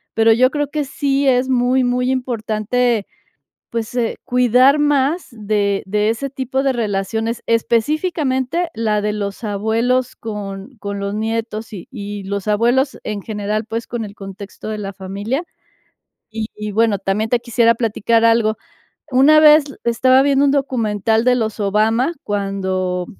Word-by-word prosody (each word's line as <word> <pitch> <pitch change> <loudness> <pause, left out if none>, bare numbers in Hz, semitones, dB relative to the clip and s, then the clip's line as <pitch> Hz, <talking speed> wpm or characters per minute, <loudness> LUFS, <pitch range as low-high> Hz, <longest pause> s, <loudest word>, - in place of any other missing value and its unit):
pero 225 0 +5
yo 255 +3 +3
creo 290 -2 -2
que 300 -1 -2
sí 275 0 0
es 255 0 +2
muy 255 +1 +2
muy 250 +1 +1
importante, 235 -2 -1 0.6
pues, 230 +1 -4
eh, 235 -2 -1
cuidar 250 +3 +4
más 295 +3 +1
de 205 -2 -1
de 210 +2 +1
ese 270 +5 -2
tipo 265 0 -2
de 270 -1 +2
relaciones, 220 +1 -2
específicamente 275 +6 0
la 215 -2 0
de 210 0 -1
los 200 +2 -5
abuelos 225 +5 0
con 210 +2 -7
con 200 -1 -5
los 200 +1 -3
nietos, 225 0 -3
y 180 - -8
y 205 -4 -6
los 200 +1 -4
abuelos 240 +6 +1
en 210 -2 -4
general, 215 0 -3
pues, 225 0 -4
con 235 -2 -4
el 200 - -10
contexto 200 +2 -9
de 215 - -3
la 200 -1 -5
familia. 200 - -4 0.9
Y 220 0 -4
y 210 0 -5
bueno, 220 -1 +2
también 200 +3 -1
te 245 - +3
quisiera 235 -1 +3
platicar 230 0 +1
algo, 225 -2 +3 0.6
una 295 +4 +6
vez 305 -1 +7 0.2
estaba 255 +3 +4
viendo 280 0 +3
un 275 - +3
documental 225 -5 0
de 250 0 +4
los 220 -2 -2
Obama 220 - +2
cuando, 190 -3 -2
225 Hz, 155 wpm, -19 LUFS, 210-255 Hz, 0.9 s, vez